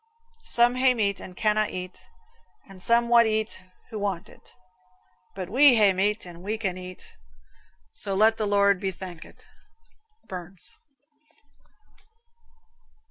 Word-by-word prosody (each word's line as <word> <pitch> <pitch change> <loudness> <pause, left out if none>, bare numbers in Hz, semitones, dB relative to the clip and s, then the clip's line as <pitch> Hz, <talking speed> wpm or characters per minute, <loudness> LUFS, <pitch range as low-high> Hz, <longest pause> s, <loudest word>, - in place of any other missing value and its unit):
Some 240 +1 +4
hae 255 0 +3
meat 200 -4 0
and 180 -1 -10
canna' 215 0 +2
eat, 180 0 -7 0.7
And 195 -1 -9
some 235 +3 +2
wad 235 -1 +5
eat 215 -2 -2 0.3
who 215 - -5
want 195 -4 -3
it; - - -18 0.8
But 185 -2 -5
we 260 +6 +6
hae 205 -3 +5
meat 205 +3 0
and 175 -1 -11
we 210 +4 -3
can 195 -5 -2
eat, 185 0 -10 0.8
So 200 -3 -4
let 220 +3 +4
the 215 - -1
Lord 200 -1 +3
be 195 0 -2
thankit. 180 -2 -11 0.8
Burns. 180 0 -10
200 Hz, 130 wpm, -25 LUFS, 185-220 Hz, 0.8 s, we